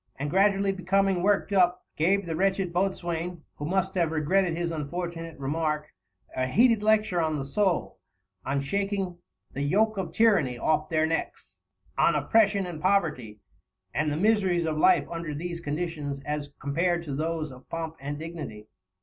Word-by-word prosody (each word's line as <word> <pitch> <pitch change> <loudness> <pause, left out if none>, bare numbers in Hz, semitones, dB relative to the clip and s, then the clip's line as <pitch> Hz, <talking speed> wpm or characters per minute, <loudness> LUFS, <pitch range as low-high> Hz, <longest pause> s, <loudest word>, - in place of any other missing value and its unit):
and, 145 +2 -4
gradually 195 +1 +3
becoming 195 0 +1
worked 205 +1 +1
up, 180 -2 +3
gave 195 +5 +2
the 165 -1 -3
wretched 190 0 0
boatswain, 175 -2 -2
who 145 - -4
must 190 +3 0
have 170 -4 +1
regretted 165 +3 +1
his 170 -1 -1
unfortunate 165 +1 -5
remark, 150 +2 -2 0.4
a 130 0 0
heated 230 - +4
lecture 215 -4 +2
on 160 -1 0
the 135 - -3
soul, 185 +4 0 0.4
on 140 +1 -1
shaking 195 +3 -2 0.3
"the 140 - -3
Yoak 210 +9 +2
of 190 -2 -3
Tyranny" 190 - +3
off 155 +4 +1
their 155 -1 +2
necks, 165 +1 -4 0.4
on - - +4
"Oppression 205 -3 +3
and 170 -4 -6
Poverty" 150 - 0 0.5
and 150 +1 0
the 145 - -1
miseries 190 -3 +2
of 160 -1 -1
life 175 -2 +4
under 165 -3 -5
these 170 +2 -4
conditions 150 -3 -3
as 150 0 -4
compared 170 +5 0
to 145 -4 -5
those 155 +1 -2
of 130 0 -14
"Pomp 165 -1 -4
and 145 +2 -4
Dignity." 155 -10 -7
170 Hz, 160 wpm, -27 LUFS, 150-190 Hz, 0.5 s, heated